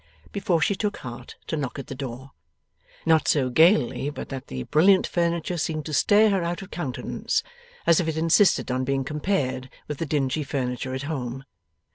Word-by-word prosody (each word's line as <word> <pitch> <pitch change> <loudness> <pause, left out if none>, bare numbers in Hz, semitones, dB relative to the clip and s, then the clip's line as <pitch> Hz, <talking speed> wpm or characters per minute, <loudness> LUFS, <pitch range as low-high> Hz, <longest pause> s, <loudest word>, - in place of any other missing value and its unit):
before 195 -4 +1
she 180 - +2
took 205 +1 -2
heart 120 0 -9
to - - -2
knock 140 -4 -3
at 135 - -5
the - - -7
door. 130 0 -7 0.7
Not 160 -1 +4
so 130 -4 +2
gaily, 150 - +4
but 145 - -7
that 135 -2 -6
the 65 -1 -5
brilliant 185 - +4
furniture 170 0 -1
seemed 155 0 -2
to 155 - -5
stare 210 +7 +5
her 190 -3 +1
out 175 +3 -3
of 190 - -13
countenance 150 -7 -2 0.4
as 170 - +5
if 175 - 0
it 160 -1 -1
insisted 165 -2 +3
on 130 +1 0
being 135 +1 0
compared 145 -4 -1 0.2
with 150 - -5
the 165 - -2
dingy 145 0 0
furniture 130 -1 -3
at 130 - -4
home. 135 -4 -4
150 Hz, 185 wpm, -25 LUFS, 130-170 Hz, 0.7 s, stare